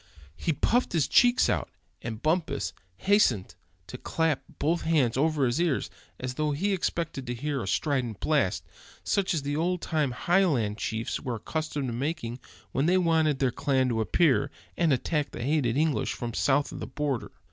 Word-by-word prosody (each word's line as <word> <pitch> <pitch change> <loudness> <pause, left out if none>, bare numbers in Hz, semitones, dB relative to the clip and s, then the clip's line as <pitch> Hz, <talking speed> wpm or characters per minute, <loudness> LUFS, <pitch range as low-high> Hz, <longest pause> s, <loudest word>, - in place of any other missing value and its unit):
He 165 - -1
puffed 230 - +1
his 160 -6 +2
cheeks 245 0 +5
out, - - 0 0.3
and 110 -2 -6
Bumpus 155 -3 0 0.2
hastened 130 - +2 0.3
to 125 - -9
clap 160 -4 0 0.2
both 170 +3 +1
hands 150 -8 +2
over 150 0 +2
his 120 +6 +1
ears, 165 -6 0 0.3
as 125 0 -3
though 150 +2 0
he 195 +8 0
expected 165 -7 -2
to 120 - -2
hear 140 +2 -2
a 95 - -5
strident 125 - 0
blast, - - +1 0.4
such 195 -2 +1
as 150 - -2
the 145 +1 -2
old 175 +3 0
time 155 -4 0
Highland 125 - +1
chiefs 110 +1 -2
were 125 -2 -3
accustomed 150 +2 -3
to - - -3
making 125 -2 -3 0.3
when 140 +4 +1
they 185 +2 +4
wanted 160 -5 +2
their 130 -2 +1
clans 130 +1 +1
to 115 -2 0
appear, 140 - +3 0.3
and 170 -3 +2
attack 145 +3 0
the 120 - -6
hated 135 -3 +1
English 150 -7 +1
from 120 -1 -5
south 140 +4 +2
of - - -7
the - - -5
border. 135 -1 -2
145 Hz, 180 wpm, -28 LUFS, 125-160 Hz, 0.4 s, cheeks